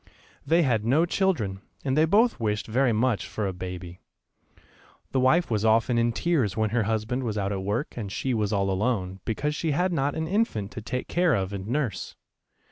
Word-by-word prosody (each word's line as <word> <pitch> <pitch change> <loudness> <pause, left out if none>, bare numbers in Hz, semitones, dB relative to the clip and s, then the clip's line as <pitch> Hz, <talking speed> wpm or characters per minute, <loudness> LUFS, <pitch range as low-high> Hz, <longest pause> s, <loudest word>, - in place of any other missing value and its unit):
They 165 +3 +4
had 115 -7 +1
no 140 +9 +3
children, 135 - 0 0.2
and 135 -1 +1
they 155 +1 +5
both 215 +8 +3
wished 105 -2 -1
very 125 +3 +2
much 115 0 +1
for 105 - -3
a 95 - -2
baby. 90 -1 -7 1.1
The 135 - +1
wife 130 +5 +3
was 105 -2 +1
often 115 +2 +3
in 120 0 +2
tears 125 - 0
when 110 -1 +1
her 115 -2 +1
husband 110 +3 -1
was 110 -4 -2
out 100 -1 -1
at 95 -1 -2
work 105 +9 -2
and 105 -5 -5
she 130 +5 -1
was 105 -3 0
all 100 -2 +1
alone, 95 -2 -1
because 145 +7 -1
she 155 0 -1
had 180 +4 +1
not 145 -2 0
an 160 0 -2
infant 170 - 0
to 110 - -7
take 125 +4 -4
care 175 -5 +2
of 95 -1 -2
and 95 0 -5
nurse. 125 -6 -2
115 Hz, 205 wpm, -26 LUFS, 105-145 Hz, 1.1 s, they